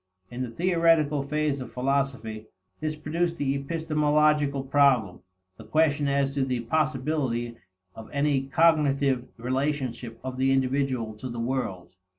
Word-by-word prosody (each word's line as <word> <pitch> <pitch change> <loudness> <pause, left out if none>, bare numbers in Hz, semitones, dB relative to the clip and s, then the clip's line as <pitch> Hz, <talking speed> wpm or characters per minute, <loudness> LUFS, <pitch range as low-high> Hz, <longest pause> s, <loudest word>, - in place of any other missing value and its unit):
In 120 +1 -5
the 125 - -3
theoretical 165 -1 +2
phase 145 0 -1
of 125 - -8
philosophy, 125 -5 -2 0.3
this 155 0 -2
produced 165 +3 -2
the 140 -3 0
epistemological 150 -1 +1
problem: 135 -8 +3 0.4
the - - -11
question 145 +3 +2
as 140 0 +1
to 140 -1 0
the 125 -2 -1
possibility 130 -3 -1 0.4
of 110 - -11
any 140 -2 +1
cognitive 140 -4 +2
relationship 130 -2 -2
of 130 -1 -5
the 135 +1 +2
individual 130 -4 0
to 130 +4 -6
the 120 -1 -5
world. 115 -8 -3
140 Hz, 135 wpm, -26 LUFS, 125-150 Hz, 0.4 s, problem